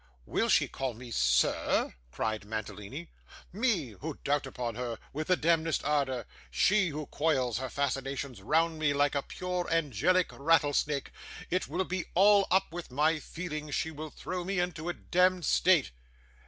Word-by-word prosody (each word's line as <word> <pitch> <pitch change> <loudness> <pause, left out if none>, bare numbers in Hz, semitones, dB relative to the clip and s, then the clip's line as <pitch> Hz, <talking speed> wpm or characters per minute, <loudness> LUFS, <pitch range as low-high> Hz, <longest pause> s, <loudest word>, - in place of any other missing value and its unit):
'Will - - 0
she - - +4
call 130 -3 -4
me 120 +1 -10
"Sir"?' - - +2 0.2
cried 110 +9 -2
Mantalini. 110 +8 -6 0.4
'Me 200 - +1
who 155 0 -5
dote 145 -1 +1
upon 125 -3 -4
her 120 -1 -4 0.2
with 155 +2 -3
the 185 - +4
demdest 165 -1 +1
ardour! 135 -6 0 0.2
She, 190 - +3
who 155 -1 -4
coils 130 -7 0
her 130 0 -4
fascinations 135 -3 -3
round 160 +7 +1
me 150 -2 +2
like 145 0 +2
a 140 - +1
pure 180 +3 -3
angelic 165 - +2
rattlesnake! 145 -1 +1 0.4
It 185 +1 0
will 180 +5 -1
be 185 -1 -3
all 200 +2 +6
up 190 0 +2
with 175 -1 -6
my 150 +5 +2
feelings; 155 -3 -5
she 160 - -1
will 155 0 -7
throw 180 +4 -5
me 195 +2 -2
into 175 -2 -2
a 175 - -2
demd 180 0 +2
state. 175 -5 +3
150 Hz, 160 wpm, -30 LUFS, 130-175 Hz, 0.4 s, all